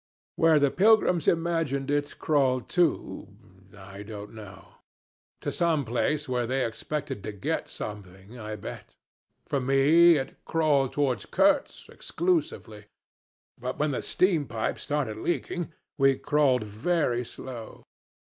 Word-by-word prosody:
Where 165 -1 +4
the 145 -2 +3
pilgrims 190 -5 +3
imagined 165 -5 0
it 145 0 -1
crawled 130 -5 +1
to 175 -5 0 0.5
I 100 +1 -10
don't 105 0 -9
know. 105 -4 -12 0.7
To - - -2
some 160 -5 +1
place 145 +6 -1
where 125 -2 -1
they 130 +1 0
expected 135 +2 -4
to 105 - -5
get 100 -2 -3
something, 100 +2 -8
I 110 -1 -5
bet! - - -9 0.5
For 140 - -1
me 145 +6 +5
it 135 - -6
crawled 150 -5 +2
toward 135 -5 -1
Kurtz 290 -1 +2
exclusively; 315 - -2 0.7
but 125 +1 -4
when 150 0 0
the 130 - -2
steam 170 -7 +1
pipes 110 -1 -3
started 145 -7 -2
leaking 175 +5 -3 0.3
we 135 -1 +4
crawled 140 -5 +2
very 120 +3 0
slow. 120 -1 -9
135 Hz, 130 wpm, -27 LUFS, 115-160 Hz, 0.7 s, me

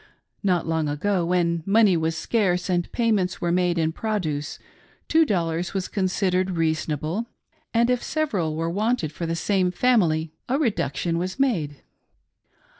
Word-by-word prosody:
Not 180 -4 +1
long 160 -2 0
ago, 180 +5 0
when 170 -1 +1
money 200 0 +4
was 160 0 -1
scarce 185 -1 0
and 175 -1 0
payments 210 -6 +1
were 175 - 0
made 180 -1 +1
in 160 -1 +1
produce, 160 -8 -3 0.5
two 320 -1 +4
dollars 170 -2 -1
was 190 -1 -1
considered 185 -2 0
reasonable; 160 - -1 0.4
and 235 0 +3
if 250 -1 +1
several 200 - -1
were 165 +1 -1
wanted 205 -2 0
for 165 +2 -5
the 165 - -1
same 185 +1 +1
family, 175 -7 +2 0.2
a 265 - +2
reduction 175 - -1
was 185 +7 -4
made. 165 - 0
180 Hz, 145 wpm, -24 LUFS, 165-210 Hz, 0.5 s, money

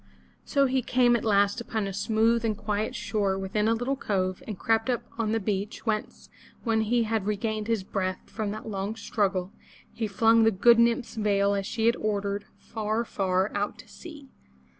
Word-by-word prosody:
So 280 -2 +2
he 260 0 +1
came 245 0 +3
at 235 - -1
last 200 0 +2
upon 220 -3 -2
a 195 - -4
smooth 225 +3 +2
and 220 -3 0
quiet 210 0 -2
shore 200 -3 -1
within 205 +3 -1
a 225 - +3
little 245 +4 -1
cove 185 -7 -1
and 210 -4 -5
crept 225 +4 +1
up 245 -2 0 0.2
on 220 -2 0
the 225 - +1
beach, 205 +1 -3
whence, 215 -2 -3 0.4
when 225 -2 +1
he 230 +2 +2
had 220 -2 -1
re 210 - +1
gained 215 0 -2
his 225 -4 0
breath 185 -1 -2
from 215 -2 -4
that 215 +2 -6
long 200 0 -3
struggle, 195 -4 -1 0.4
he 225 - -2
flung 225 +3 +4
the 225 - +6
good 230 +3 +5
nymph's 235 +1 +2
veil 200 -2 +2
as 200 -1 -2
she 225 -1 -1
had 235 +1 +4
ordered, 200 -1 -2
far, 220 +1 -2
far 190 -1 0
out 205 0 -2
to - - -14
sea. 305 -5 -11
215 Hz, 195 wpm, -27 LUFS, 200-230 Hz, 0.4 s, the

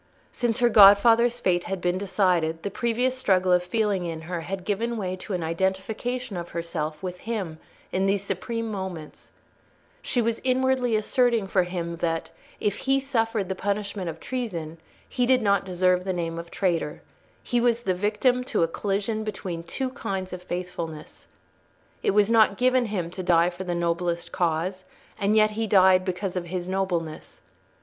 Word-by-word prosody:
Since 235 -2 0
her 240 - +5
godfather's 225 +3 +7
fate 175 -1 +1
had 195 -1 -3
been 180 +1 0
decided, 180 -5 +1
the 200 - -3
previous 245 +3 0
struggle 185 -7 +2
of 180 0 +5
feeling 200 0 0
in 165 -1 -5
her 170 +1 -4
had 185 +2 -5
given 230 +3 -1
way 185 -3 -2
to 190 - -6
an 180 -2 -2
identification 190 +8 -2
of 175 0 -5
herself 165 -1 -4
with 180 -1 -5
him 195 -8 -4 0.3
in 190 +1 +1
these 195 0 +1
supreme 225 +4 -3
moments: 190 -6 -7 0.7
she 245 - 0
was 230 -1 0
inwardly 260 -2 +2
asserting 230 0 +2
for 190 -1 +2
him 170 -2 -4
that, 165 -1 -2 0.3
if 205 -1 0
he 270 0 +1
suffered 225 -7 -1
the 190 - -1
punishment 200 -1 -3
of 160 0 -7
treason, 170 -12 -4 0.3
he 245 -1 0
did 255 -2 +4
not 200 -1 +2
deserve 180 0 +2
the 190 0 -2
name 165 -1 -3
of 170 0 -8
traitor; 170 -6 -1 0.4
he 240 -1 0
was 235 -1 +2
the 190 -5 0
victim 215 +7 +1
to 170 - +1
a - - +3
collision 205 +5 -2
between 190 -5 -5
two 255 +10 -4
kinds 190 -7 -4
of 180 - -6
faithfulness. 175 -3 -6 0.7
It - - +1
was 210 -1 +5
not 220 -3 +4
given 255 0 +3
him 180 -5 -3
to 185 - -5
die 175 -1 +3
for 180 +2 -7
the 175 -1 -2
noblest 170 0 -1
cause, 175 +2 -1 0.4
and 205 +1 +2
yet 215 0 +5
he 220 +1 -2
died 190 -2 +5
because 185 0 -3
of 180 -1 -2
his 175 0 -4
nobleness. 180 -4 -3
190 Hz, 175 wpm, -25 LUFS, 175-225 Hz, 0.7 s, godfather's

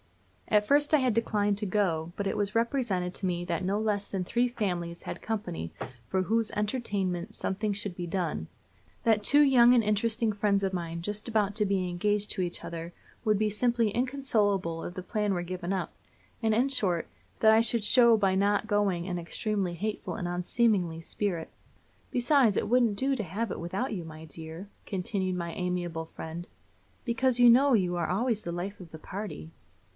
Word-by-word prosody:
At 210 -1 +3
first 290 +5 +3
I - - +8
had 255 -4 +2
declined 205 -2 +1
to 210 - -2
go, 175 -5 0
but 200 - -2
it - - -1
was 205 +1 -1
represented 225 -7 0
to 195 - -2
me 175 -1 -1
that 170 0 -2
no 195 +3 0
less 210 -2 -1
than 190 -2 -2
three 240 +6 +1
families 175 -7 -3
had - - -6
company 180 - -4 0.4
for 190 -1 +1
whose 225 +2 +1
entertainment 205 -3 -2
something 210 +2 -1
must 200 -2 -4
be 175 -1 -5
done; 165 - -2 0.6
that 220 -2 +3
two 285 +7 +6
young 250 -4 +6
and 235 - +4
interesting 215 +1 +1
friends 200 -1 +1
of 190 -1 0
mine 170 -2 -4
just 210 +4 -3
about 210 -3 +1
to 210 -1 +3
be 190 -2 0
engaged 205 +4 0
to 190 - 0
each 175 -1 -4
other 170 +1 -6 0.3
would 215 -3 +3
be 215 +1 +1
simply 230 +1 +1
inconsolable 210 -9 0
if 175 - -6
the 185 - -5
plan 210 0 -1
were 175 - -2
given 180 0 -4
up; 190 -3 -2 0.5
and, 220 -1 +2
in 240 +5 +3
short, 190 -11 +1 0.3
that 220 - +6
I 220 - +6
should 230 -1 0
show 235 +1 +6
by 195 -2 +2
not 205 +2 +2
going 200 -4 +1
an 175 -2 -2
extremely 190 +1 -2
hateful 210 +5 -3
and 180 - -3
unseemly 180 -1 +1
spirit 170 0 -3 0.6
"besides, 245 -3 +3
it - - 0
wouldn't 235 -4 +3
do 270 +3 +1
to 225 - -2
have 205 +6 -3
it - - -4
without 195 +9 -3
you, 180 -4 -4
my 160 0 -10
dear," 160 +4 -9 0.2
continued 185 -1 -2
my 170 -1 -4
amiable 175 -3 -2
friend, 165 +2 -8 0.6
"because 250 +1 +1
you 245 -1 +8
know 265 +4 +6
you 180 -5 +2
are 170 -2 -1
always 220 +3 0
the 170 - -4
life 180 +4 -5
of 170 -3 -12
the 160 - -9
party." 185 - -7
205 Hz, 190 wpm, -29 LUFS, 175-225 Hz, 0.6 s, I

